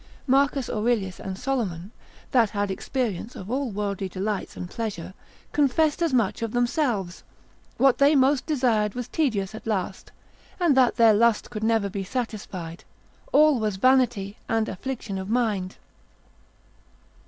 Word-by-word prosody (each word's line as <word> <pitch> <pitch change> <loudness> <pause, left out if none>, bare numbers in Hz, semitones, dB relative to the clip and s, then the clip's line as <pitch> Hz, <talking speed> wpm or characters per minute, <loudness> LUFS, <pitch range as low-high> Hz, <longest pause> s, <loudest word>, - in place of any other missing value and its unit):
Marcus 275 0 +2
Aurelius 215 -4 -1
and 190 -1 -5
Solomon, 210 -8 -3 0.4
that 235 -5 +4
had 205 -2 -2
experience 230 +1 -3
of 190 +4 -7
all 270 0 -1
worldly 200 -2 -3
delights 195 +2 -3
and 180 - -5
pleasure, 190 -4 -5 0.4
confessed 295 +3 +2
as 335 -2 +2
much 235 -6 +1
of 230 -1 -3
themselves; 240 - 0 0.5
what 270 -2 +4
they 285 +2 +5
most 270 0 +3
desired, 235 -8 +1
was 245 -1 -4
tedious 220 -10 -1
at 220 - -9
last, 190 -3 -3 0.5
and 340 -6 +3
that 255 -2 +4
their 230 -2 +6
lust 230 +2 +2
could 215 -2 -5
never 225 -2 +2
be 195 0 -4
satisfied, 190 -7 -5 0.5
all 305 - +5
was 215 -3 -1
vanity 240 -3 +2
and 225 -1 +1
affliction 205 -1 -5
of 190 +1 -6
mind. 215 -6 -1
225 Hz, 140 wpm, -25 LUFS, 195-260 Hz, 0.5 s, their